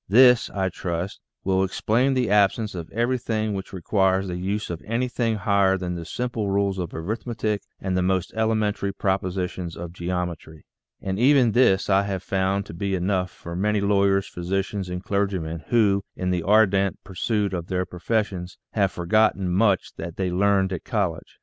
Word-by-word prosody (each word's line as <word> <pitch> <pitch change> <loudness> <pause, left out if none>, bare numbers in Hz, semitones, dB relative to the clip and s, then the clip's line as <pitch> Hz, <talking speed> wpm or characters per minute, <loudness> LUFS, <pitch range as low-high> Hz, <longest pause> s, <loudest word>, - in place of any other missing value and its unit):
This, 125 +2 +6
I 95 -1 -1
trust, 90 +1 -4 0.2
will 95 0 +2
ex 95 - -3
plain 125 +5 +2
the 125 -5 +1
absence 105 +1 +3
of 85 -3 -6
everything 115 -2 -1
which 95 -1 -5
requires 95 +1 +1
the 90 - -3
use 100 +3 -2
of 85 - -5
anything 115 0 -1
higher 100 -1 +2
than 90 -1 -3
the 85 -1 -5
simple 115 0 -3
rules 100 -1 0
of 90 -2 -3
arithmetic 110 +3 -3 0.2
and 95 -1 -2
the 90 - +2
most 95 -1 0
elementary 110 -3 0
propositions 90 -3 -2
of 85 0 -7
geometry. 85 -3 -4 0.4
And 95 +1 -2
even 130 -2 +5
this 100 -5 +3
I 95 0 +4
have 95 -2 -3
found 95 +1 0
to 80 - -9
be 95 +3 -2
enough 90 0 0
for 85 -1 -9
many 105 +3 +1
lawyers, 100 -1 +2
physicians, 95 +2 -3
and 90 +1 -4
clergymen 95 -6 -2
who, 100 -4 +3
in 90 0 -1
the 90 -1 0
ardent 100 0 +3
pursuit 100 +1 -1
of 85 -2 -3
their 90 0 -1
profes 105 +6 0
sions, 90 -3 -8
have 100 -3 +1
forgotten 95 +1 +2
much 100 0 +2
that 85 0 -6
they 95 -2 -1
learned 95 0 +2
at 90 - -5
college. 95 -8 -2
95 Hz, 175 wpm, -24 LUFS, 90-105 Hz, 0.4 s, This